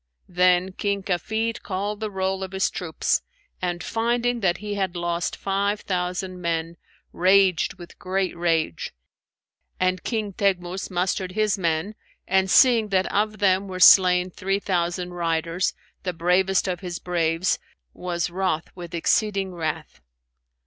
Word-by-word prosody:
Then 180 +1 +3
King 200 +1 -2
Kafid 220 +5 -1
called 205 +2 -3
the 215 -1 -3
roll 190 -1 -2
of 190 0 -7
his 190 0 +1
troops 165 -3 -1 0.4
and, 175 -2 -2
finding 240 +1 0
that 185 -5 +1
he 210 -1 -5
had 190 -3 -2
lost 175 0 -2
five 200 +1 -1
thousand 180 0 -3
men, 165 0 -2 0.4
raged 190 -1 +3
with 175 -2 -13
great 190 0 -1
rage; 165 - -1 0.8
and 185 0 +1
King 215 -4 -2
Teghmus 185 -1 -1
mustered 185 0 -1
his 215 -1 +2
men 170 +2 -1 0.3
and 190 0 +2
seeing 235 0 +5
that 190 -1 +1
of 215 +1 +1
them 195 -1 +2
were 185 -1 -6
slain 180 0 +7
three 195 +2 -1
thousand 180 -2 -2
riders, 170 +1 -1 0.3
the 180 -2 -3
bravest 180 +3 +2
of 180 -1 -2
his 180 -3 -5
braves, 170 0 0 0.3
was 175 -1 -3
wroth 180 -3 -1
with 175 -1 -7
exceeding 195 +2 +1
wrath. 160 -3 -4
185 Hz, 140 wpm, -24 LUFS, 175-195 Hz, 0.8 s, slain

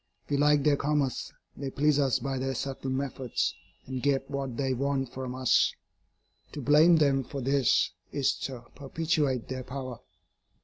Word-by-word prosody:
We 145 - +1
like 145 0 +4
their 145 -1 +4
commerce, 145 -2 -1 0.2
they 140 -1 -4
please 145 +2 +2
us 135 -3 +3
by 135 -1 -3
their 135 0 -2
subtle 135 +1 -4
methods, 130 -2 -1 0.3
and 130 -1 -4
get 140 0 0
what 135 -4 -3
they 135 -2 0
want 135 -1 -1
from 130 -1 -5
us. 130 -2 +3 0.8
To 150 - -5
blame 155 +5 +6
them 140 -3 +3
for 140 +3 -6
this 135 -1 +2 0.2
is 140 -2 +1
to 130 -3 -8
perpetuate 145 -3 -1
their 130 0 -4
power. 130 -2 -6
135 Hz, 160 wpm, -28 LUFS, 130-145 Hz, 0.8 s, blame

